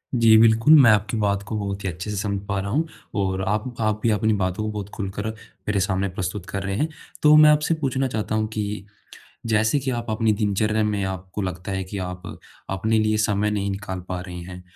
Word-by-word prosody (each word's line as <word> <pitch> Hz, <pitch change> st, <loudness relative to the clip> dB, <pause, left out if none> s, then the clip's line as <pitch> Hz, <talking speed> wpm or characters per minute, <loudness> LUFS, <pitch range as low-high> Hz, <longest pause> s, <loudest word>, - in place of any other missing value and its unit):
जी, 115 Hz, -2 st, +6 dB
बिल्कुल, 115 Hz, +6 st, +6 dB
मैं 120 Hz, -, +7 dB
आपकी 105 Hz, +2 st, +1 dB
बात 100 Hz, -1 st, +1 dB
को 110 Hz, -, -3 dB
बहुत 100 Hz, 0 st, -4 dB
ही 95 Hz, -, -1 dB
अच्छे 90 Hz, +5 st, -6 dB
से 105 Hz, -, -3 dB
समझ 100 Hz, -1 st, -1 dB
पा 100 Hz, -1 st, -1 dB
रहा 100 Hz, -, -3 dB
हूँ, 160 Hz, +7 st, +1 dB, 0.3 s
और 95 Hz, -2 st, 0 dB
आप 110 Hz, +5 st, -1 dB
आप 110 Hz, -1 st, 0 dB
भी 115 Hz, -, +3 dB
अपनी 110 Hz, +1 st, +2 dB
बातों 95 Hz, 0 st, -1 dB
को 110 Hz, -, -2 dB
बहुत 105 Hz, -1 st, -5 dB
खुलकर 100 Hz, 0 st, -4 dB
मेरे 105 Hz, -2 st, -4 dB
सामने 95 Hz, 0 st, 0 dB
प्रस्तुत 90 Hz, +1 st, -4 dB
कर 100 Hz, -1 st, -3 dB
रहे 95 Hz, 0 st, -2 dB
हैं। 155 Hz, -, +1 dB, 0.4 s
तो 150 Hz, 0 st, +7 dB
मैं 155 Hz, 0 st, +8 dB
आपसे 150 Hz, +2 st, +3 dB
पूछना 135 Hz, 0 st, 0 dB
चाहता 110 Hz, -2 st, -2 dB
हूँ 110 Hz, 0 st, 0 dB
कि, 105 Hz, -1 st, -3 dB, 0.6 s
जैसे 110 Hz, +5 st, +2 dB
कि 130 Hz, 0 st, -2 dB
आप 120 Hz, -2 st, -4 dB
अपनी 110 Hz, 0 st, +2 dB
दिनचर्या 105 Hz, +1 st, +1 dB
में 105 Hz, -2 st, 0 dB
आपको 95 Hz, +1 st, -5 dB
लगता 90 Hz, 0 st, -4 dB
है 95 Hz, 0 st, -2 dB
कि 95 Hz, +2 st, -7 dB
आप 90 Hz, 0 st, -8 dB, 0.5 s
अपने 110 Hz, +4 st, +1 dB
लिए 110 Hz, 0 st, +2 dB
समय 105 Hz, 0 st, +1 dB
नहीं 100 Hz, -1 st, -1 dB
निकाल 95 Hz, -1 st, -5 dB
पा 90 Hz, -, -2 dB
रही 90 Hz, -1 st, -8 dB
हैं, 90 Hz, 0 st, -9 dB
105 Hz, 225 wpm, -23 LUFS, 95-110 Hz, 0.6 s, मैं